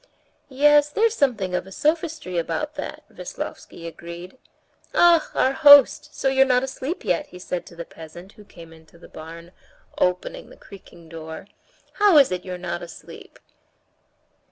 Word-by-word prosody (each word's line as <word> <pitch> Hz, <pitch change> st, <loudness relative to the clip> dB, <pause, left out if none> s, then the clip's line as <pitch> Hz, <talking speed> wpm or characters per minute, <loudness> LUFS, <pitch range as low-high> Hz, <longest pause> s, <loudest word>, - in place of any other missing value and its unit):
"Yes, 295 Hz, +2 st, +4 dB
there's 445 Hz, +8 st, +1 dB
something 225 Hz, -, 0 dB
of 180 Hz, +1 st, -2 dB
a -, -, -12 dB
sophistry 305 Hz, -, -1 dB
about 295 Hz, -, -3 dB
that," -, -, -7 dB
Veslovsky 170 Hz, -, -8 dB
agreed. 170 Hz, +3 st, -9 dB, 0.6 s
"Ah! 340 Hz, -2 st, +5 dB
our 260 Hz, -, +2 dB
host; 285 Hz, -1 st, +6 dB
so -, -, -2 dB
you're 265 Hz, 0 st, +4 dB
not 255 Hz, -1 st, +2 dB
asleep 265 Hz, +3 st, -5 dB
yet?" 180 Hz, -4 st, 0 dB
he 180 Hz, -, -13 dB
said 180 Hz, -1 st, -5 dB
to 170 Hz, -, -14 dB
the 170 Hz, 0 st, -7 dB
peasant 165 Hz, +4 st, -13 dB
who 210 Hz, -, -16 dB
came 165 Hz, -4 st, -15 dB
into 160 Hz, +1 st, -19 dB
the 170 Hz, -, -15 dB
barn, 165 Hz, +2 st, -11 dB, 0.5 s
opening 180 Hz, 0 st, -2 dB
the -, -, -16 dB
creaking 175 Hz, -4 st, -15 dB
door. 160 Hz, +1 st, -9 dB, 0.6 s
"How 405 Hz, -6 st, +6 dB
is 275 Hz, -7 st, +6 dB
it 180 Hz, -1 st, -3 dB
you're 185 Hz, -1 st, -6 dB
not 175 Hz, -1 st, -5 dB
asleep?" 170 Hz, -1 st, -12 dB
185 Hz, 155 wpm, -23 LUFS, 170-285 Hz, 0.6 s, host